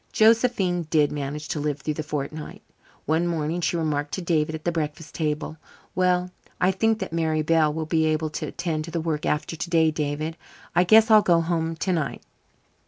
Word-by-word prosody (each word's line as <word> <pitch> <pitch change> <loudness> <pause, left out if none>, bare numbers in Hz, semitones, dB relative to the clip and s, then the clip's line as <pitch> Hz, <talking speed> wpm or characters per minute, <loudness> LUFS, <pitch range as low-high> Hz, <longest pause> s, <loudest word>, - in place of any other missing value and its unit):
Josephine 215 -7 +3
did 150 -3 +3
manage 145 +1 -4
to 155 - -2
live 145 -1 -2
through 155 - -2
that 155 - -4
fortnight. 150 +1 -5 0.4
One 160 +3 +1
morning 165 0 -1
she 170 +1 0
remarked 150 -3 -1
to 190 - -4
David 160 -2 0
at 155 - -8
the 175 - +2
breakfast 155 -1 -4
table: 155 0 -2 0.4
"Well, 180 0 +1 0.3
I 185 - +3
think 220 +3 +1
that 190 - -5
Mary 160 -2 0
Bell 155 -1 +3
will 160 +1 -3
be 160 0 +1
able 155 0 0
to 150 - -4
attend 155 -3 -3
to - - -8
the 170 - -2
work 160 -2 -2
after 150 +2 -1
today, 160 0 +2
David. 155 +2 -3 0.4
I 180 - +4
guess 220 +4 +6
I'll 215 -1 +8
go 170 -4 +3
home 165 -1 -1
tonight." 165 -4 -2
160 Hz, 190 wpm, -24 LUFS, 150-175 Hz, 0.4 s, I'll